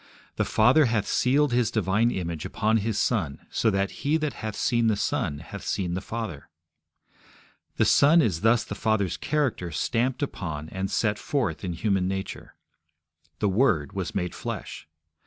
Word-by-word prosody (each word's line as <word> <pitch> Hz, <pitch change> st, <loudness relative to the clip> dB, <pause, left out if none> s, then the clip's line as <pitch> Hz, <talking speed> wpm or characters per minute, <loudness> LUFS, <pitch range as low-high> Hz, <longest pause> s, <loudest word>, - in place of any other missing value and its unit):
The -, -, 0 dB
Father 125 Hz, +8 st, +4 dB
hath 115 Hz, -4 st, +1 dB
sealed 140 Hz, +1 st, +2 dB
His 120 Hz, -2 st, +2 dB
divine 110 Hz, +2 st, +1 dB
image 85 Hz, -7 st, -3 dB
upon 110 Hz, +1 st, +1 dB
His 110 Hz, 0 st, -1 dB
Son, 70 Hz, 0 st, 0 dB
so 115 Hz, -, +2 dB
that 100 Hz, -1 st, 0 dB
he 150 Hz, +3 st, +2 dB
that 155 Hz, -2 st, -2 dB
hath 110 Hz, -2 st, -5 dB
seen 120 Hz, -2 st, +1 dB
the 110 Hz, -, +3 dB
Son 75 Hz, -6 st, -1 dB
hath 90 Hz, +6 st, -9 dB
seen 90 Hz, -3 st, -2 dB
the 90 Hz, -, -2 dB
Father. 110 Hz, -9 st, -6 dB, 1.3 s
The -, -, +3 dB
Son 150 Hz, +4 st, +6 dB
is 100 Hz, -, +1 dB
thus 115 Hz, +2 st, +4 dB
the -, -, -6 dB
Father's 110 Hz, -5 st, 0 dB
character 140 Hz, -, -1 dB
stamped 120 Hz, -, -1 dB
upon 80 Hz, -, -4 dB
and 95 Hz, 0 st, -3 dB
set 105 Hz, 0 st, 0 dB
forth 125 Hz, -, -2 dB
in 90 Hz, -2 st, -2 dB
human 95 Hz, +1 st, 0 dB
nature. 95 Hz, 0 st, -5 dB, 0.8 s
The 105 Hz, -, +1 dB
Word 95 Hz, -, +2 dB
was 95 Hz, -3 st, -4 dB
made 90 Hz, -2 st, -1 dB
flesh. -, -, -6 dB
105 Hz, 165 wpm, -26 LUFS, 90-120 Hz, 1.3 s, Son